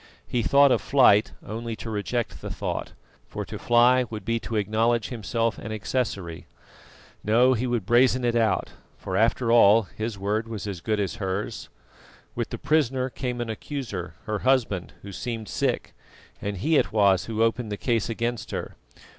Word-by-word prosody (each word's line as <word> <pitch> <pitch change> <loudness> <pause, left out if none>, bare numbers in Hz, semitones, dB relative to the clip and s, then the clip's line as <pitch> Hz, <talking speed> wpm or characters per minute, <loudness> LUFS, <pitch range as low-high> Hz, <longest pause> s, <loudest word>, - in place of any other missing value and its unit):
He 120 - 0
thought 140 +4 +5
of - - +2
flight 115 -6 +4
only 115 +1 -5
to 115 - -9
reject 110 +2 -3
the - - -5
thought, - - -4 0.3
for - - -5
to - - -7
fly 125 +2 +4
would 105 -3 -7
be 115 0 0
to 115 - -5
acknowledge 110 +2 +1
himself 115 -1 -1
an 110 - -7
accessory. 100 -6 -3 0.8
No, 120 +5 +4
he 125 +1 -1
would 120 -5 -1
brazen 125 +2 +4
it 120 -1 +1
out, 110 -5 +1 0.3
for 95 - -5
after 115 +3 +2
all 115 -1 +6
his 110 +2 -5
word 105 +3 -1
was 110 -4 -5
as 95 -4 -5
good 110 +2 -1
as 100 +3 -2
hers. 100 +2 -4 0.6
With - - -3
the - - -5
prisoner 135 -3 +1
came 125 -2 -4
an 120 - -4
accuser, 110 - -5
her 105 -1 -2
husband, 120 -9 +1
who 100 - -8
seemed 115 +2 -5
sick, - - -1 0.5
and 100 -1 -3
he 155 - +2
it - - +1
was 100 -4 +3
who 115 0 0
opened 115 -1 0
the 105 - -3
case 115 -1 0
against 115 0 -3
her. - - -5
115 Hz, 175 wpm, -25 LUFS, 105-120 Hz, 0.8 s, all